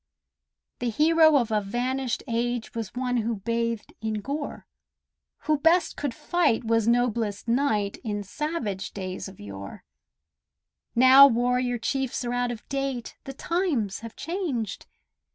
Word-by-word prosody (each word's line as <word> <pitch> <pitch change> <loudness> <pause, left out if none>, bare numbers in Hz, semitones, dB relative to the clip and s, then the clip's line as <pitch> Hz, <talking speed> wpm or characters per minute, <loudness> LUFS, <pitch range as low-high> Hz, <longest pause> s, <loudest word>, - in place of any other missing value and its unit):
The 245 - -1
hero 315 +5 +5
of 235 -4 0
a 210 -1 +2
vanished 250 +5 -2
age 240 0 -2
Was 225 -2 -5
one 250 0 0
who 230 0 0
bathed 230 +2 -2
in 220 0 -2
gore; 280 +8 -4 0.8
Who 305 -2 +1
best 330 +3 +3
could 280 -5 -3
fight 335 -10 +1
was 225 -1 +1
noblest 235 -3 +1
knight 225 -5 +1
In 205 -3 -3
savage 220 - -4
days 185 -1 -5
of 190 -1 -13
yore; 100 -1 -9 1.1
Now 260 +3 +9
warrior 245 0 +1
chiefs 260 +1 -2
are 240 - -2
out 245 0 0
of 235 -3 -7
date, 275 -3 -3
The 270 - -6
times 280 - -1
have 230 0 -9
changed. 320 - -3
240 Hz, 135 wpm, -26 LUFS, 220-275 Hz, 1.1 s, Now